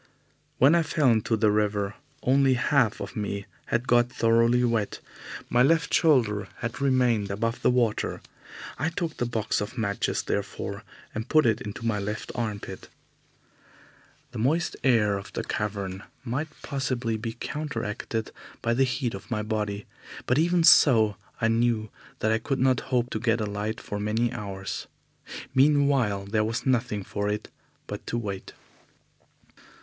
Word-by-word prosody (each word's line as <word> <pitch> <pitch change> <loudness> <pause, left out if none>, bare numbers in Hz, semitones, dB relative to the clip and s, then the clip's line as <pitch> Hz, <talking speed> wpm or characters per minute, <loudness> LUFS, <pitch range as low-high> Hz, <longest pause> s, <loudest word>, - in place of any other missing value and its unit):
When 135 +5 +6
I 170 - +5
fell 150 -4 +2
into 110 0 +1
the 105 0 +3
river, 105 -1 0 0.3
only 135 0 +4
half 125 -3 +2
of - - -6
me 100 -2 -3 0.2
had 120 +2 -1
got 120 0 +4
thoroughly 115 +1 +3
wet. 115 -4 0 0.5
My 120 - +3
left 160 +3 +3
shoulder 115 - +3
had 120 +3 -5
remained 125 -6 +2
above 115 +4 -2
the - - +4
water. 120 -4 +1 0.6
I 160 - +1
took 170 -1 -3
the 120 - -1
box 110 -4 -1
of 105 +5 -5
matches, 100 -3 -1
therefore, - - -3 0.3
and 110 +3 -5
put 155 -1 +5
it 115 -2 +2
into 105 +2 -6
my 110 -3 +1
left 105 +2 -4
armpit. 105 -5 -5 1.4
The - - -6
moist 150 +9 +1
air 105 -6 +3
of 100 - -11
the - - -2
cavern 100 -2 -3 0.2
might 130 +6 -2 0.2
possibly 130 -5 -1
be 115 +1 -4
counteracted 115 -5 -4 0.3
by 115 - +2
the 135 +3 +3
heat 125 -1 -2
of 100 - -9
my 110 -3 -1
body, 105 -2 -2 0.4
but 125 +4 +2
even 175 +1 +3
so, 115 - +6 0.2
I 115 - +2
knew 115 -1 +1 0.3
that 110 - +2
I 110 - +2
could 135 +4 -2
not 130 -1 +3
hope 125 -2 +1
to 110 - -2
get 115 0 +1
a 110 - 0
light 105 +2 -3
for 105 - -5
many 110 +3 0
hours. 95 -2 -5 0.7
Meanwhile 135 -8 +3
there 110 +2 +1
was 115 +3 -2
nothing 120 -6 +1
for 100 +2 -2
it 105 +1 -3 0.4
but - - -7
to 120 - -1
wait. 100 -5 -5
115 Hz, 155 wpm, -26 LUFS, 105-130 Hz, 1.4 s, When